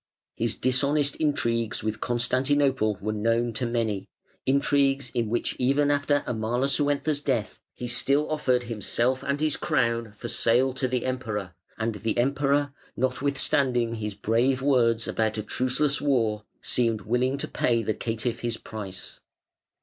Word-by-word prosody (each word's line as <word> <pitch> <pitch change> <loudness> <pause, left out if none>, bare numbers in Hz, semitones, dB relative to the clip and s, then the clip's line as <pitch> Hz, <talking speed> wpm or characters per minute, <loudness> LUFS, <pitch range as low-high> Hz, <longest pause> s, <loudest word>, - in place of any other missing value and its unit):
His 115 -1 -1
dishonest 140 +3 +2
intrigues 115 -7 0
with 110 0 -3
Constantinople 130 -2 +1
were 105 +1 -1
known 115 +2 +1
to 115 +2 -1
many, 115 -4 -1 0.4
intrigues 135 -1 +2
in 120 -3 -1
which 120 +1 -1
even 140 +3 +3
after 145 0 +1
Amalasuentha's 140 +6 0
death 125 -7 -1 0.2
he 125 - -5
still 140 +5 +2
offered 130 -5 +1
himself 120 +3 -1
and 140 +1 -1
his 155 -1 +1
crown 115 -3 0
for 120 - -6
sale 120 +2 +2
to 130 0 -1
the 125 -1 -1
Emperor, 110 -8 -3 0.2
and 115 0 -1
the 110 +3 -2
Emperor, 140 +2 +1 0.2
notwithstanding 130 -2 +1
his 105 -3 -4
brave 120 +6 +1
words 120 -5 +2
about 110 -1 0
a 110 - -2
truceless 130 +6 +1
war, 115 -7 +1 0.2
seemed 115 -3 +1
willing 125 +6 0
to - - -4
pay 115 -2 +1
the 110 - 0
caitiff 115 +1 -3
his 120 -1 -2
price. 95 -4 -8
125 Hz, 140 wpm, -26 LUFS, 115-140 Hz, 0.4 s, even